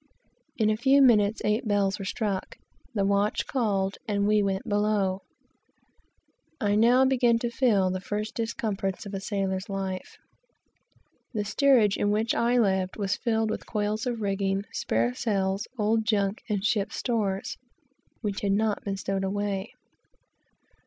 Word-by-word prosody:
In 215 Hz, -2 st, +3 dB
a 215 Hz, -, 0 dB
few 270 Hz, +4 st, +4 dB
minutes 220 Hz, -5 st, +4 dB
eight 215 Hz, +3 st, 0 dB
bells 200 Hz, -2 st, +1 dB
were 195 Hz, -, -5 dB
struck, 200 Hz, -2 st, -3 dB, 0.4 s
the 200 Hz, -2 st, +1 dB
watch 200 Hz, +1 st, +1 dB
called, 200 Hz, -6 st, -1 dB
and 200 Hz, -1 st, 0 dB
we 210 Hz, 0 st, +3 dB
went 195 Hz, -1 st, -1 dB
below. 205 Hz, -2 st, +1 dB, 1.4 s
I 205 Hz, -2 st, +1 dB
now 240 Hz, +5 st, +5 dB
began 245 Hz, -3 st, +3 dB
to 235 Hz, 0 st, -3 dB
feel 210 Hz, -7 st, +2 dB
the 185 Hz, -, -2 dB
first 210 Hz, +4 st, -4 dB
discomforts 215 Hz, -5 st, -3 dB
of 200 Hz, -, -8 dB
a 195 Hz, -, -2 dB
sailor's 195 Hz, 0 st, -2 dB
life. 190 Hz, -1 st, -4 dB, 1.2 s
The 210 Hz, -1 st, -1 dB
steerage 235 Hz, -3 st, +3 dB
in 205 Hz, -, +1 dB
which 215 Hz, +2 st, +1 dB
I 240 Hz, +1 st, +2 dB
lived 190 Hz, -5 st, +1 dB
was 200 Hz, -1 st, 0 dB
filled 225 Hz, -2 st, 0 dB
with -, -, -5 dB
coils 210 Hz, +2 st, -1 dB
of 235 Hz, -2 st, -2 dB
rigging, 195 Hz, -1 st, 0 dB
spare 115 Hz, +2 st, 0 dB
sails, 195 Hz, -, -1 dB
old 220 Hz, +1 st, +2 dB
junk 205 Hz, -1 st, 0 dB
and 205 Hz, -1 st, -1 dB
ship 205 Hz, -3 st, +1 dB
stores, 205 Hz, -6 st, -2 dB, 0.7 s
which 205 Hz, -3 st, -3 dB
had 200 Hz, -1 st, +1 dB
not 215 Hz, 0 st, 0 dB
been 195 Hz, -1 st, -3 dB
stowed 195 Hz, 0 st, -2 dB
away. 200 Hz, +1 st, -2 dB
205 Hz, 150 wpm, -27 LUFS, 195-220 Hz, 1.4 s, now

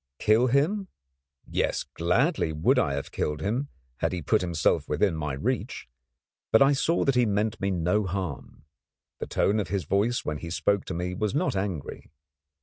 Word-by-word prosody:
Kill 110 Hz, -, +3 dB
him? 160 Hz, -, +1 dB, 0.6 s
Yes, -, -, -1 dB
gladly 90 Hz, -, 0 dB
would 85 Hz, -, +2 dB
I 80 Hz, -, +1 dB
have 70 Hz, -, -5 dB
killed 75 Hz, 0 st, -2 dB
him, 115 Hz, -, -1 dB, 0.3 s
had -, -, -1 dB
he 90 Hz, -3 st, -4 dB
put 105 Hz, +7 st, +2 dB
himself 85 Hz, -3 st, 0 dB
within 80 Hz, +4 st, +1 dB
my 75 Hz, -2 st, -3 dB
reach; 65 Hz, -, -3 dB, 0.6 s
but 110 Hz, -, +6 dB
I 135 Hz, +1 st, +5 dB
saw 160 Hz, +5 st, +1 dB
that 135 Hz, -, +3 dB
he 125 Hz, -2 st, +3 dB
meant 105 Hz, +2 st, -1 dB
me 100 Hz, -, +1 dB
no 90 Hz, +3 st, +1 dB
harm. 85 Hz, -6 st, -5 dB, 0.5 s
The -, -, -4 dB
tone 105 Hz, +2 st, +1 dB
of 100 Hz, -, -2 dB
his 95 Hz, 0 st, -2 dB
voice 100 Hz, +9 st, 0 dB
when 75 Hz, -1 st, -3 dB
he 85 Hz, -, -7 dB
spoke 100 Hz, +3 st, 0 dB
to 90 Hz, -, -5 dB
me 90 Hz, +1 st, -3 dB
was 105 Hz, +5 st, -2 dB
not 155 Hz, -, 0 dB
angry. 95 Hz, -7 st, -4 dB
100 Hz, 180 wpm, -27 LUFS, 85-120 Hz, 0.6 s, but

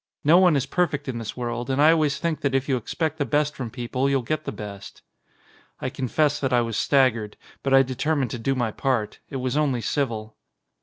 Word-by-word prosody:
No 165 Hz, +5 st, +6 dB
one 180 Hz, -4 st, +5 dB
is 140 Hz, -1 st, +1 dB
perfect 170 Hz, -3 st, -1 dB
in 125 Hz, -3 st, -3 dB
this 115 Hz, +1 st, -6 dB
world 120 Hz, 0 st, -3 dB
and 135 Hz, +1 st, 0 dB
I 155 Hz, +2 st, +7 dB
always 155 Hz, -3 st, +2 dB
think 165 Hz, -2 st, -2 dB
that 140 Hz, -2 st, 0 dB
if 135 Hz, 0 st, 0 dB
you 135 Hz, -, +2 dB
expect 155 Hz, +6 st, -3 dB
the -, -, +2 dB
best 150 Hz, +3 st, 0 dB
from 125 Hz, -3 st, -5 dB
people 130 Hz, +2 st, -2 dB
you'll 135 Hz, -2 st, +1 dB
get 155 Hz, +5 st, -2 dB
the -, -, -3 dB
best." 100 Hz, -2 st, -9 dB, 0.8 s
I 130 Hz, -, -3 dB
confess 145 Hz, +3 st, 0 dB
that 135 Hz, -, -1 dB
I 120 Hz, -1 st, +4 dB
was 115 Hz, -2 st, -3 dB
staggered, 115 Hz, -6 st, +2 dB, 0.2 s
but 135 Hz, -, -2 dB
I 135 Hz, 0 st, +7 dB
determined 130 Hz, 0 st, -1 dB
to 120 Hz, -, -4 dB
do 135 Hz, +4 st, 0 dB
my 120 Hz, -3 st, 0 dB
part. 125 Hz, -4 st, -1 dB
It -, -, -8 dB
was 130 Hz, 0 st, -2 dB
only 140 Hz, -5 st, +1 dB
civil. 110 Hz, -4 st, -2 dB
135 Hz, 220 wpm, -24 LUFS, 120-145 Hz, 0.8 s, I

